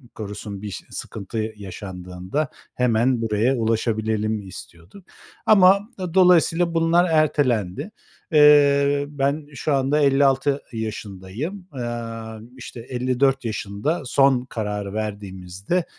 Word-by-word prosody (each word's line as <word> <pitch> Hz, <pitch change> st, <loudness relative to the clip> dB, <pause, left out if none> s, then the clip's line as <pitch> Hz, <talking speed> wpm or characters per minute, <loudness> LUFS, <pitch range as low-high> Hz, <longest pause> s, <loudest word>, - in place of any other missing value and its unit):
korusun 105 Hz, -1 st, -7 dB
bir 105 Hz, -, -5 dB
ş -, -, -8 dB
sıkıntı 110 Hz, +2 st, -5 dB
yaşandığında 95 Hz, -, -5 dB, 0.3 s
hemen 120 Hz, 0 st, +2 dB
buraya 115 Hz, +4 st, +1 dB
ulaşabilelim 110 Hz, -2 st, -1 dB
istiyorduk 90 Hz, -, -12 dB, 0.4 s
ama 200 Hz, +1 st, +5 dB, 0.2 s
dolayısıyla 175 Hz, -2 st, +4 dB
bunlar 165 Hz, +2 st, +3 dB
ertelendi. 145 Hz, -, +1 dB, 0.4 s
Eee, 145 Hz, -1 st, +5 dB
ben 145 Hz, +1 st, -1 dB
şu 145 Hz, +2 st, -1 dB
anda 135 Hz, +2 st, +2 dB
56 140 Hz, 0 st, +3 dB
yaşındayım, 110 Hz, -, -6 dB
aaa, 115 Hz, -3 st, -6 dB, 0.2 s
işte 120 Hz, -1 st, -9 dB
54 130 Hz, +2 st, 0 dB
yaşında 110 Hz, -, -2 dB
son 130 Hz, -1 st, +3 dB
kararı 105 Hz, -4 st, -4 dB
verdiğimizde, 100 Hz, -, -3 dB
120 Hz, 100 wpm, -22 LUFS, 105-145 Hz, 0.4 s, ama